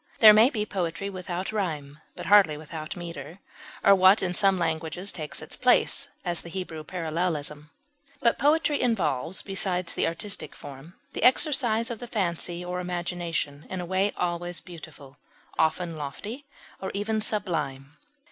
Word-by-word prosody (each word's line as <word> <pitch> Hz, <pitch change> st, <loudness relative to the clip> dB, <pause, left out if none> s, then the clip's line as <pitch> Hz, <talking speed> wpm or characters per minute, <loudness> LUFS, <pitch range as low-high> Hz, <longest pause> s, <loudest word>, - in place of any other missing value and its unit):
There 215 Hz, -2 st, +10 dB
may 220 Hz, +4 st, +7 dB
be 215 Hz, -6 st, -2 dB
poetry 190 Hz, 0 st, -3 dB
without 185 Hz, 0 st, -4 dB
rime, 150 Hz, -9 st, -3 dB, 0.2 s
but -, -, -7 dB
hardly 195 Hz, -7 st, +6 dB
without 155 Hz, +1 st, -7 dB
meter, 170 Hz, -2 st, -7 dB, 0.5 s
or 200 Hz, -, +8 dB
what 190 Hz, +1 st, +6 dB
in 180 Hz, -1 st, 0 dB
some 195 Hz, 0 st, +3 dB
languages 165 Hz, +2 st, -2 dB
takes 155 Hz, -3 st, -4 dB
its -, -, -6 dB
place, -, -, +3 dB, 0.2 s
as 175 Hz, -2 st, 0 dB
the 170 Hz, -, -10 dB
Hebrew 165 Hz, -3 st, -5 dB
parallelism; 155 Hz, -3 st, -3 dB, 0.5 s
but 235 Hz, -4 st, +2 dB
poetry 300 Hz, 0 st, +3 dB
involves, 190 Hz, -, 0 dB
besides 185 Hz, -3 st, -1 dB
the -, -, +1 dB
artistic 170 Hz, +5 st, -4 dB
form, 140 Hz, +5 st, -11 dB, 0.2 s
the -, -, -4 dB
exercise 250 Hz, -4 st, +3 dB
of 230 Hz, -, -5 dB
the 245 Hz, -, -7 dB
fancy 175 Hz, -4 st, -2 dB
or 180 Hz, 0 st, -3 dB
imagination 175 Hz, -4 st, -3 dB
in 190 Hz, -, -4 dB
a 175 Hz, -, -3 dB
way 190 Hz, +3 st, +1 dB
always 175 Hz, 0 st, -2 dB
beautiful, 150 Hz, -5 st, -12 dB, 0.4 s
often 165 Hz, +1 st, +1 dB
lofty 205 Hz, -, -6 dB, 0.3 s
or 190 Hz, -, -3 dB
even 215 Hz, +2 st, 0 dB
sublime. 150 Hz, -10 st, -2 dB
180 Hz, 150 wpm, -27 LUFS, 160-200 Hz, 0.5 s, There